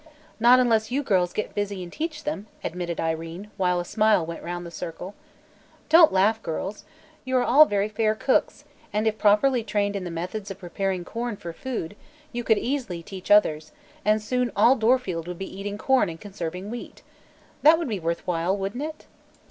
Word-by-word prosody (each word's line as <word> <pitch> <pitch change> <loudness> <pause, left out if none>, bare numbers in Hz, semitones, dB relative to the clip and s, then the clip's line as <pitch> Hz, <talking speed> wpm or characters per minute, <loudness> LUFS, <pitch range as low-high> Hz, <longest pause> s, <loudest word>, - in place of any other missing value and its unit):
"Not 240 +2 +7
unless 225 -3 +2
you 275 +4 -1
girls 185 -8 +2
get 215 - -4
busy 205 -2 -3
and 175 - -10
teach 310 -1 -4
them," 220 -9 -4 0.2
admitted 175 0 -4
Irene, 165 +5 -4
while 180 -2 +1
a 175 - -3
smile 215 -3 +2
went 165 0 -7
round 175 0 -5
the 170 - -8
circle. 180 +3 -7 0.8
"Don't 325 0 +8
laugh, 210 +4 +2
girls. 190 +4 -5 0.4
You 260 0 0
are 250 - +3
all 285 +6 +7
very 205 -5 0
fair 215 0 0
cooks, 260 +4 0 0.3
and 210 +1 0
if 220 -1 0
properly 230 +4 +4
trained 205 -1 -1
in 195 - -3
the 180 - -5
methods 185 +5 -5
of 195 - -6
preparing 185 0 -3
corn 235 0 -4
for 170 -2 -7
food, 220 -4 -5 0.4
you 240 0 -4
could 220 -2 +3
easily 235 -11 -3
teach 190 +2 -9
others, 155 -7 +3 0.3
and 215 +1 +2
soon 250 +2 0
all 255 - +6
Dorfield 220 -8 +1
would 180 -1 -5
be 190 0 -7
eating 205 +1 -4
corn 260 -3 +2
and 165 0 -8
conserving 190 0 -6
wheat. 240 - -8 0.6
That 315 +2 +7
would 335 -2 -3
be 210 -5 -2
worth 170 0 -3
while, 180 +2 0
wouldn't 200 +6 -4
it?" 310 +1 -6
205 Hz, 190 wpm, -25 LUFS, 180-240 Hz, 0.8 s, Don't